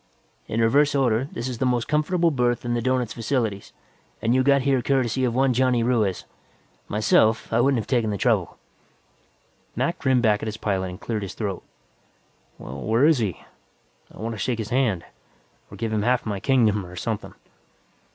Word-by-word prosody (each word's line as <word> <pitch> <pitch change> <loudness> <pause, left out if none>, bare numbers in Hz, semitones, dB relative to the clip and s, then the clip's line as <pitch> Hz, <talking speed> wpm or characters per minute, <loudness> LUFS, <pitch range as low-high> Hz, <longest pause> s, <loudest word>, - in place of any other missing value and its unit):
In 115 - -1
reverse 145 +6 +3
order, 130 -1 +1
this 120 +2 -4
is 125 -3 -5
the - - +1
most 125 -2 0
comfortable 165 +3 +1
berth 120 -3 0
in 120 - -1
the 120 - 0
doughnut's 125 -1 0
facilities, 115 -4 -2 0.5
and 115 +2 +1
you 130 - +3
got 140 0 +3
here 135 -2 +2
courtesy 130 -1 0
of 120 -1 -1
one 135 0 +3
Johnny 125 -1 +2
Ruiz. 110 -6 0 0.6
Myself, 110 +1 +2
I 115 - +4
wouldn't 135 +1 +3
have 110 - -2
taken 120 -4 0
the 100 - -2
trouble." - - 0 1.2
Mac 140 +9 -1
grinned 130 -3 +2
back 105 -2 +3
at - - -4
his 110 0 -4
pilot 95 -4 -1
and 90 - -9
cleared 110 -3 -3
his 100 - -6
throat. 100 -4 -3 1.0
"Well, 65 +1 -8
where 115 - +2
is 155 -4 +4
he? 100 -8 -3 0.7
I - - -16
wanta 115 -1 -5
shake 120 +3 -1
his 110 -1 -5
hand, 120 -9 +1 0.7
or - - -11
give 110 -1 -3
him 105 - +1
half 125 +3 +1
my 105 -3 -3
kingdom, 110 -5 +2
or 90 0 -11
something." 105 +5 -4
120 Hz, 185 wpm, -24 LUFS, 110-130 Hz, 1.2 s, I